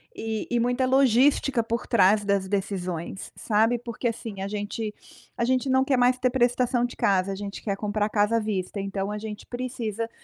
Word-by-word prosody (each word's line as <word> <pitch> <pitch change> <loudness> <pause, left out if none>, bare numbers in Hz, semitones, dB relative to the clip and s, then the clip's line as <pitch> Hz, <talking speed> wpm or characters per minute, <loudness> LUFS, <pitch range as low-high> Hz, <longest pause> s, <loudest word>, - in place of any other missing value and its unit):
e 220 -1 -3
e 240 - +2
muita 245 +2 +1
logística 265 -1 +3
por 230 +1 -3
trás 205 -2 +4
das 200 -1 +1
decisões, 185 -3 -3
sabe, 225 +2 +2
porque 235 0 -4
assim, 220 -4 -5
a 195 - -2
gente 210 +1 -4 0.5
a 235 - +1
gente 260 +1 +1
não 260 0 +4
quer 265 -2 +2
mais 250 +1 +4
ter 255 0 +2
prestação 245 -1 +2
de 245 - -6
casa, 195 0 +2
a - - -3
gente 200 0 -6
quer 200 -3 -2
comprar 210 0 -1
casa 210 +2 +2
à - - +2
vista, 200 -2 -3
então 195 0 -3
a 210 - -3
gente 215 -1 -7
precisa 230 -3 -4
220 Hz, 195 wpm, -26 LUFS, 200-245 Hz, 0.5 s, trás